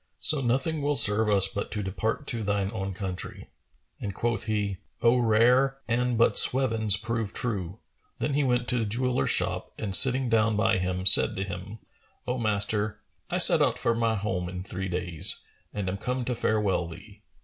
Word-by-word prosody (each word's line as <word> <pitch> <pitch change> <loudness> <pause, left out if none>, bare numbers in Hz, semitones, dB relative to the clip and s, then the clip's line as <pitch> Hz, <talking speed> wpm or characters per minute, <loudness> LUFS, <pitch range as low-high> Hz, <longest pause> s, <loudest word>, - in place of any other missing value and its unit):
So 150 -2 +2
nothing 135 +5 -1
will 145 +1 0
serve 105 -2 +5
us 100 -2 +6
but 100 +1 -5
to 105 -1 -3
depart 110 +8 -3
to 120 -4 -2
thine 100 -1 -2
own 95 -3 -5
country." 95 -2 -7 0.5
And 100 -2 -6
quoth 115 -3 -2
he, 105 -3 -2 0.3
"O 120 +1 +4
rare! 125 +4 +2
an 120 +1 -1
but 115 - +4
swevens 115 -6 +1
prove 115 -1 -4
true!"[FN#434] 100 -7 -4 0.4
Then 145 - -2
he 145 +1 +1
went 125 -2 0
to 125 - 0
the 115 - -1
jeweller's 125 +4 -1
shop - - -1
and 100 -3 0
sitting 130 +4 +5
down 110 -1 +1
by 105 -3 +1
him, 90 0 -3
said - - +5
to 95 - -3
him, 95 +3 -8 0.5
"O 125 +1 -3
master, 105 0 -1 0.3
I - - -2
set - - +8
out - - +1
for 115 - 0
home 105 -6 -2
in 90 0 -7
three 95 0 -5
days' 90 -3 0
time, - - -19 0.4
and 95 - -3
am 95 - -4
come 125 +2 -3
to 125 - -2
farewell 105 -6 -1
thee. 100 +5 -13
110 Hz, 185 wpm, -26 LUFS, 95-120 Hz, 0.5 s, set